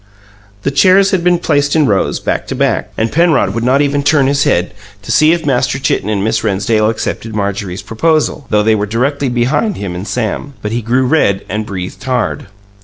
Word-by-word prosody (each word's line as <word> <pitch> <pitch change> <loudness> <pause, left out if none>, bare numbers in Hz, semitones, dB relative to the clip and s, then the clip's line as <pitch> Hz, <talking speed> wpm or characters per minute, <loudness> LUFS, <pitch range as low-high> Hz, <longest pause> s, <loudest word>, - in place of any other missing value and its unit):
The 140 - 0
chairs 185 +7 +4
had 185 -3 0
been 180 0 +3
placed 145 -3 0
in 155 -2 +4
rows, 100 -6 0
back - - -2
to - - -4
back, - - 0
and 110 +1 0
Penrod 160 - +2
would 115 +1 -2
not 130 +4 +3
even 145 0 0
turn 140 -1 +3
his 140 +1 +1
head 90 +1 +1 0.3
to 115 - -5
see 155 +6 +4
if 170 -2 -1
Master 130 -1 +1
Chitten 110 -6 -1
and 100 -2 -1
Miss 110 +1 0
Rennsdale 110 +1 +1
accepted 115 0 -4
Marjorie's 100 -2 -3
proposal, 155 +2 0
though 105 -1 +2
they 110 +1 +3
were 105 -1 -1
directly 135 +5 -1
behind 125 - 0
him 100 -3 -4
and 90 +3 -6
Sam; 125 +4 -3
but 105 - -3
he 120 +1 -1
grew 125 +4 +1
red 125 -9 +1
and 105 +2 -3
breathed 90 -2 -6
hard. 130 -5 -2
120 Hz, 205 wpm, -14 LUFS, 105-145 Hz, 0.3 s, chairs